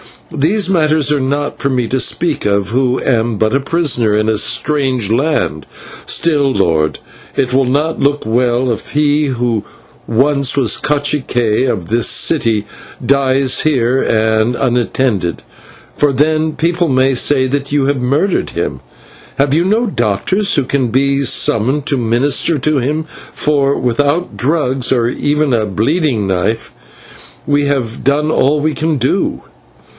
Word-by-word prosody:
These 170 +7 0
matters 155 -5 +2
are 145 - +1
not 140 +2 -2
for 140 - -1
me 125 -3 -1
to 130 - 0
speak 165 +3 0
of, 100 -1 0
who 125 +2 0
am 115 -3 0
but 110 +2 0
a 135 - +2
prisoner 135 -8 0
in 110 +1 0
a 110 - +1
strange 130 -5 0
land; 120 - -1 0.4
still, 145 -5 +1
lord, 80 -8 0 0.4
it 125 -1 -1
will 135 0 +3
not 145 +5 -1
look 145 -1 0
well 120 +2 +1
if 115 - -5
he 150 0 +2
who 120 -5 -1 0.4
once 140 +3 +1
was 125 -6 +2
/cacique/ 135 -5 0
of 90 -8 -3
this 115 +1 +1
city 115 -9 +1 0.4
dies 135 -1 +2
here 130 -4 +1
and 110 +1 +1
unattended, 120 -7 -1 0.5
for 145 -1 +2
then 155 +3 0
people 170 +1 0
may 130 -1 +2
say 130 +1 +2
that 140 +1 -3
you 145 -2 +2
have 140 0 0
murdered 145 +10 0
him. - - -3 0.6
Have 140 0 +1
you 165 +3 +2
no 220 +5 +1
doctors 185 - 0
who 140 - +2
can 130 0 -1
be 135 +4 +1
summoned 130 +5 +1
to 140 - +1
minister 125 +7 +1
to 150 +2 0
him, 145 +5 -1 0.3
for, 140 -2 +1
without 145 +8 -1
drugs, 135 -2 0
or 120 -3 +2
even 145 +1 0
a 110 -2 +1
bleeding 115 - 0
knife, 95 +4 -2 0.7
we 145 0 +1
have 130 -5 -2
done 145 +4 +1
all 145 0 +2
we 155 +1 0
can 160 -1 -1
do." 130 0 -1
135 Hz, 150 wpm, -14 LUFS, 120-150 Hz, 0.7 s, will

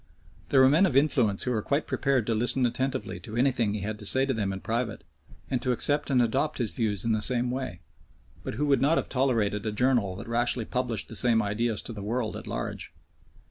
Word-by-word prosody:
There 135 - +5
were 130 - +7
men 160 +8 +4
of 135 - 0
influence 125 -8 +2
who 125 - -1
were 110 -3 0
quite 140 +7 -1
prepared 135 -5 0
to 115 - 0
listen 125 +3 +1
attentively 130 +2 -2
to 110 -2 -9
anything 120 -4 +1
he 105 - -4
had 105 +2 -4
to 105 - -8
say 130 +4 +5
to 135 - -1
them 105 -4 -2
in 95 0 -6
private, 115 0 -3 0.4
and 125 -2 -2
to 125 - 0
accept 145 +5 +1
and 130 -2 +3
adopt 135 +6 -1
his 115 -5 -1
views 105 -3 -1
in 115 - +1
the 110 -1 +1
same 125 +1 +3
way, 130 -9 -5 0.6
but - - -5
who 150 - -1
would 140 -3 +2
not 150 +5 +3
have - - -2
tolerated 115 -6 0
a - - -1
journal 115 -4 +1
that 115 +5 -9
rashly 120 0 0
published 125 -3 -2
the - - -9
same 120 -2 +4
ideas 110 +1 -1
to 115 - -6
the 105 - -7
world 110 +2 -2
at - - -8
large. - - -5
120 Hz, 230 wpm, -27 LUFS, 110-130 Hz, 0.6 s, were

